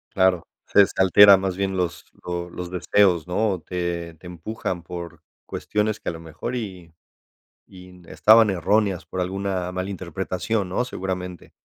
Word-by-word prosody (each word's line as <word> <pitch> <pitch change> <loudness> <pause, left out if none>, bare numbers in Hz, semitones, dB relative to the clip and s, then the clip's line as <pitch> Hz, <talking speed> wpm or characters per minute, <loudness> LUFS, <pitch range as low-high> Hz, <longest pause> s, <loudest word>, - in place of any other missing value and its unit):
Claro, 95 -2 +3 0.2
se, 100 - +6
este, 95 - -1
alteran 95 +1 +8
más 95 -1 -2
bien 95 -1 -1
los 90 -2 -2 0.2
lo 85 0 -4
los 90 -1 -6
deseos, 90 -2 +2
¿no?, 95 -1 0
te 85 -2 -3
te 80 +3 -14
empujan 90 0 -5
por 85 -1 -8 0.2
cuestiones 105 0 -2
que - - -4
a - - -1
lo 80 - -9
mejor 85 +10 -6
y 95 -8 -7 0.8
y 90 -1 -13
n 90 -2 -17
estaban 110 0 +6
erróneas 95 -1 +1
por 90 +2 -6
alguna 95 0 -2
mala 95 +1 -3
interpretación, 95 +2 -3
¿no?, 125 +7 -1
seguramente. 90 -4 -5
90 Hz, 160 wpm, -23 LUFS, 85-100 Hz, 0.8 s, alteran